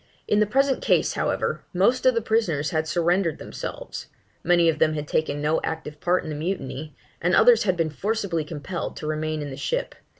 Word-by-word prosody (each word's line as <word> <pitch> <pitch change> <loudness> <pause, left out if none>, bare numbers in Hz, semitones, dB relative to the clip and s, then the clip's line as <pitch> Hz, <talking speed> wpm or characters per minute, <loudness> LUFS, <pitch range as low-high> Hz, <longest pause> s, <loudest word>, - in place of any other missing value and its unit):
In 210 - +3
the 210 - +3
present 270 +3 +2
case, - - +2
however, - - -1
most 235 +8 +3
of 255 - +5
the 230 - 0
prisoners 170 -11 +1
had 160 0 0
surrendered 175 +1 +1
themselves; - - -7 0.4
many 175 -1 +4
of 160 -2 +1
them 155 0 +3
had 150 -1 -4
taken 145 -2 -1
no 155 +2 +1
active 155 -2 -5
part 180 +1 +2
in 160 - -6
the - - -4
mutiny; 155 -3 -4 0.3
and 175 +2 +3
others 230 -2 +6
had 185 -3 +1
been 165 -2 0
forcibly 200 -1 -1
compelled 165 +3 -5
to - - -6
remain 155 0 -2
in 145 - -6
the 135 - -7
ship. - - -2
165 Hz, 200 wpm, -24 LUFS, 155-205 Hz, 0.4 s, others